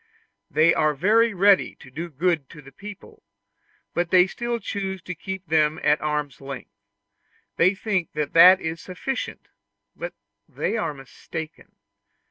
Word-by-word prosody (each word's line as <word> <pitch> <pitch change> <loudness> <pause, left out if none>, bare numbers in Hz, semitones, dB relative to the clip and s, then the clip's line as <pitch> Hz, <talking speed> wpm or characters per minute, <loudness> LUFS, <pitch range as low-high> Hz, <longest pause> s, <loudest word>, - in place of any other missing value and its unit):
They 155 +2 +4
are 155 -1 +2
very 225 +9 +3
ready 195 +1 +4
to 130 - -15
do 165 +6 -5
good 160 -1 0
to 150 - -12
the 135 - -14
people, 210 - -11 0.7
but 175 0 0
they 180 0 +6
still 235 +5 -3
choose 195 -3 -4
to 180 - -5
keep 190 +3 -6
them 155 -1 +2
at 150 +1 +3
arm's 150 -3 -2
length; 135 -1 -8 0.9
they 185 +4 +4
think 195 -4 -1
that 165 +5 +6
is 160 -1 -4
sufficient, 245 +8 -5 0.5
but - - -6 0.3
they - - -2
are 165 -10 -2
mistaken. 155 +4 -9
170 Hz, 140 wpm, -24 LUFS, 150-195 Hz, 0.9 s, they